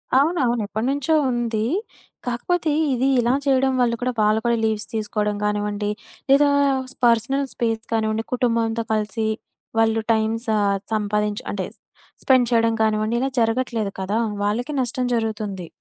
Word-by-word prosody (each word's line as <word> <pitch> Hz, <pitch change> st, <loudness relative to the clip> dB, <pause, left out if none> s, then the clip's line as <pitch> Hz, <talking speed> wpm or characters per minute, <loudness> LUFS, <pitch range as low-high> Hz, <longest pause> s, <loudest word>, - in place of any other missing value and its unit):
అవునవును 265 Hz, -5 st, +2 dB
ఎప్పటినుంచో 270 Hz, +8 st, 0 dB, 0.2 s
ఉంది. 230 Hz, -3 st, -1 dB, 0.6 s
కాకపోతే 310 Hz, +7 st, 0 dB, 0.2 s
ఇది 255 Hz, +2 st, +1 dB
ఇలా 240 Hz, +2 st, +2 dB
చేయడం 265 Hz, -1 st, +3 dB
వల్ల 235 Hz, -1 st, +2 dB
కూడా 255 Hz, +1 st, 0 dB
వాళ్ళు 215 Hz, +1 st, +3 dB
కూడా 235 Hz, -1 st, +2 dB
లీవ్స్ 220 Hz, -1 st, 0 dB
తీసుకోవడం 210 Hz, -1 st, -1 dB
గానివ్వండి, 210 Hz, 0 st, -1 dB, 0.4 s
లేదా 285 Hz, +1 st, +6 dB, 0.6 s
పర్సనల్ 240 Hz, +4 st, +2 dB
స్పేస్ 225 Hz, -1 st, -1 dB
కానివ్వండి, 220 Hz, 0 st, 0 dB
కుటుంబంతో 230 Hz, -2 st, +1 dB
కలిసి 215 Hz, +1 st, -1 dB, 0.5 s
వాళ్ళు 225 Hz, 0 st, +3 dB
టైం 220 Hz, 0 st, +1 dB, 0.2 s
స -, -, -5 dB, 0.4 s
సంపాదించు 210 Hz, 0 st, -1 dB
అంటే 190 Hz, -2 st, -3 dB, 0.6 s
స్పెండ్ 255 Hz, -3 st, +4 dB
చేయడం 230 Hz, -1 st, +3 dB
కానివ్వండి 215 Hz, +1 st, +1 dB
ఇలా 270 Hz, -, +1 dB
జరగట్లేదు 225 Hz, -2 st, 0 dB
కదా! 205 Hz, +4 st, 0 dB, 0.2 s
వాళ్ళకి 240 Hz, +8 st, -1 dB
నష్టం 250 Hz, +1 st, -1 dB
జరుగుతుంది. 210 Hz, -5 st, -3 dB
225 Hz, 130 wpm, -22 LUFS, 215-245 Hz, 0.6 s, లేదా